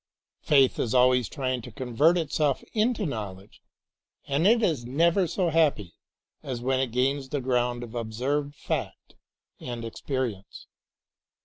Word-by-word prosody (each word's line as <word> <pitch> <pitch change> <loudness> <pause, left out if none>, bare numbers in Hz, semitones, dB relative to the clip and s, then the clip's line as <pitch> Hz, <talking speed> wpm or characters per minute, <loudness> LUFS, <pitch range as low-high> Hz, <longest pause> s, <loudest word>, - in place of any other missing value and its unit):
Faith 135 -3 +3
is 120 +1 0
always 125 -3 +4
trying 130 -4 -2
to 125 - -10
convert 130 +8 +2
itself 150 -3 0
into 220 -1 +1
knowledge 105 - -6 0.6
and 145 +5 +1
it 230 +1 +4
is 155 - +1
never 170 +9 +2
so 180 +2 0
happy 145 - +1 0.5
as 125 -3 -5
when 130 +2 0
it 130 -3 -1
gains 135 +2 0
the 145 - -1
ground 125 -1 0
of 120 0 -9
ob 115 -2 -4
served 140 +5 -2
fact - - -4 0.5
and 120 -2 -6
experience. 115 -4 -4
130 Hz, 140 wpm, -26 LUFS, 120-150 Hz, 0.6 s, always